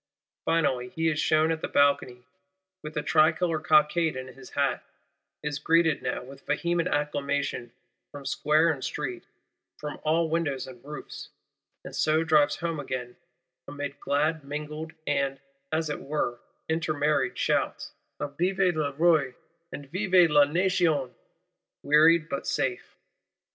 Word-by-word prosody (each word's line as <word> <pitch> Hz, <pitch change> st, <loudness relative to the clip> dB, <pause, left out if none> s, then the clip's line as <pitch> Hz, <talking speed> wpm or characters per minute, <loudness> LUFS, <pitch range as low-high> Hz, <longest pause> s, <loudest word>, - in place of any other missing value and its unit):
Finally, 130 Hz, -7 st, +1 dB
he 165 Hz, +5 st, -1 dB
is 155 Hz, -1 st, -1 dB
shewn 155 Hz, 0 st, +3 dB
at 160 Hz, -1 st, -2 dB
the -, -, -2 dB
Balcony, 130 Hz, -3 st, +2 dB, 0.6 s
with 155 Hz, 0 st, -7 dB
a 150 Hz, -, -1 dB
Tricolor 160 Hz, +1 st, +3 dB
cockade 155 Hz, +1 st, +3 dB
in 130 Hz, 0 st, -6 dB
his 130 Hz, -1 st, -13 dB
hat; 140 Hz, +2 st, +1 dB, 0.6 s
is 150 Hz, -1 st, -3 dB
greeted 165 Hz, -1 st, +3 dB
now, -, -, -3 dB
with 135 Hz, +1 st, -13 dB
vehement 170 Hz, +3 st, 0 dB
acclamation, 145 Hz, -4 st, -2 dB, 0.4 s
from 145 Hz, -2 st, -10 dB
Square 155 Hz, +4 st, +2 dB
and 140 Hz, -4 st, -5 dB
Street, 130 Hz, -5 st, -4 dB, 0.5 s
from 150 Hz, -1 st, -6 dB
all 160 Hz, +2 st, +2 dB
windows 155 Hz, -5 st, -1 dB
and 125 Hz, -2 st, -12 dB
roofs:—and 150 Hz, +1 st, -11 dB
so 155 Hz, +1 st, +2 dB
drives 155 Hz, -3 st, +3 dB
home 165 Hz, -2 st, -3 dB
again 125 Hz, -3 st, -5 dB, 0.5 s
amid 145 Hz, -1 st, -6 dB
glad 155 Hz, +2 st, 0 dB
mingled 150 Hz, +3 st, -6 dB
and, 140 Hz, -1 st, 0 dB, 0.3 s
as 160 Hz, 0 st, 0 dB
it 150 Hz, -, -3 dB
were, 140 Hz, -4 st, -2 dB, 0.3 s
intermarried 155 Hz, -4 st, 0 dB
shouts, -, -, -1 dB, 0.3 s
of 145 Hz, -1 st, -5 dB
Vive 185 Hz, 0 st, +2 dB
le 145 Hz, -2 st, -1 dB
Roi 150 Hz, -4 st, +3 dB, 0.4 s
and 140 Hz, -1 st, -9 dB
Vive 185 Hz, -3 st, +4 dB
la 145 Hz, -1 st, +6 dB
Nation; 165 Hz, -4 st, +1 dB, 0.7 s
wearied 155 Hz, +2 st, +5 dB
but 140 Hz, -, -4 dB
safe. 125 Hz, -2 st, -2 dB
150 Hz, 135 wpm, -27 LUFS, 140-160 Hz, 0.7 s, la